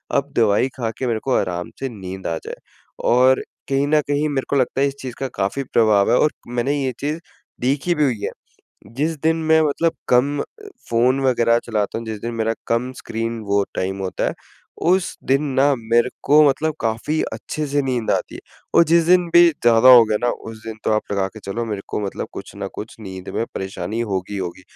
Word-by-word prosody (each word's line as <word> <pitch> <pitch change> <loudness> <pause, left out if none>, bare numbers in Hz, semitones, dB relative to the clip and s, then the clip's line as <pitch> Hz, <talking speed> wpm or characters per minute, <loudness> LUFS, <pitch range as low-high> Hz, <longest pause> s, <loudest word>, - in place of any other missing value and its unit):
अब 140 +1 0
दवाई 110 +2 +3
खा 115 -3 -1
के 130 - -2
मेरे 115 -2 0
को 135 - 0
आराम 90 -1 -3
से 135 - -3
नींद 95 -4 -7
आ 85 -1 -1
जाए। - - -6 0.5
और 130 +2 +4 0.3
कहीं 135 +1 +2
न 150 0 +3
कहीं 145 +1 +1
मेरे 135 -2 -1
को 140 - +1
लगता 135 0 +1
है, 140 - +4
इस 140 - -5
चीज़ 130 -2 -6
का 135 - -1
काफ़ी 100 +8 -1
प्रभाव 105 -3 +4
है - - +5
और 150 - +3 0.2
मैंने 120 +4 -1
ये 130 - 0
चीज़ 150 +3 -2 0.4
देखी 140 +7 +1
भी 150 - +2
हुई 125 -7 +1
है। - - -1 0.7
जिस 155 +4 0
दिन 160 +1 +3
मैं 160 0 +4
मतलब 160 +2 +1 0.2
कम 140 +4 +3
अ, - - -1 0.5
फ़ोन 125 +3 +3
वगैरह 115 -2 +3
चलाता 110 -1 -1
हूँ, 115 - -8
जिस 110 -2 -5
दिन 120 +2 -4
मेरा 115 0 0
कम 125 +2 0
स्क्रीन 115 +1 -3
वो 100 0 +3
टाइम 95 +1 -2
होता 95 - -2
है, - - -5 0.5
उस 180 +2 +2
दिन 135 +2 +2
ना, 140 +1 +4
मेरे 115 +2 +2
को 150 +2 +6
मतलब 155 +3 0
काफ़ी 115 +7 -1
अच्छे 155 -1 -4
से 145 0 0
नींद 125 -4 -1
आती - - -1
है - - -8 0.3
और 170 - +7
जिस 165 +1 +4
दिन 180 0 +5
भी 175 0 +9
ज़्यादा 120 -4 +4
हो 125 -3 +10
गया 110 -1 0
ना, 120 - +1
उस 110 0 -8
दिन 110 -1 -5
तो - - +1
आप 110 - +2
लगा 100 -1 +1
के 110 +3 -13
चलो, 105 +4 -4
मेरे 105 -3 -4
को - - -2
मतलब - - -4
कुछ - - -9
ना 100 - -4
कुछ 110 - -8
नींद 95 -2 -8
में 115 - 0
परेशानी 100 +3 -4
होगी 100 -4 -3
ही 100 - -3
होगी। 90 0 -5
120 Hz, 220 wpm, -21 LUFS, 110-140 Hz, 0.7 s, हो